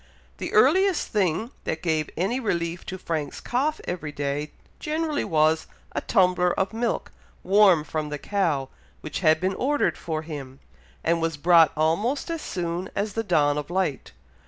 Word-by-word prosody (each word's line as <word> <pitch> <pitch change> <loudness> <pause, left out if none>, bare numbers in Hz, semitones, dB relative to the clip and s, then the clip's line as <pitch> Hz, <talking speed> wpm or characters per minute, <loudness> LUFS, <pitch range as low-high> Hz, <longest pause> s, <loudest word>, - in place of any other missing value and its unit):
The - - -4
earliest 380 -2 +4
thing 210 +3 0
that 160 - -3
gave 160 -3 0
any 200 +9 0
relief 170 -7 -2
to 185 - -4
Frank's 160 -5 -3
cough 290 +6 -1
every 170 -4 -4
day, 145 +1 -3 0.3
generally 310 -1 -1
was, 155 0 +2 0.2
a - - -2
tumbler 180 -1 +2
of 190 +3 0
milk, 230 +1 -2 0.3
warm 195 -5 +5
from 155 -1 -3
the 150 - -3
cow, 155 -7 -1 0.3
which - - -4
had 155 0 +4
been 185 +2 0
ordered 285 +8 0
for 155 -2 -3
him, 140 -4 -8 0.4
and 165 0 +1
was 165 -2 -1
brought 165 +1 +6
almost 205 - 0
as 330 -2 -3
soon 175 +1 -3
as 205 0 -1
the 225 - 0
dawn 150 -6 +2
of 150 - -7
light. 180 -6 -1
175 Hz, 160 wpm, -25 LUFS, 155-210 Hz, 0.4 s, brought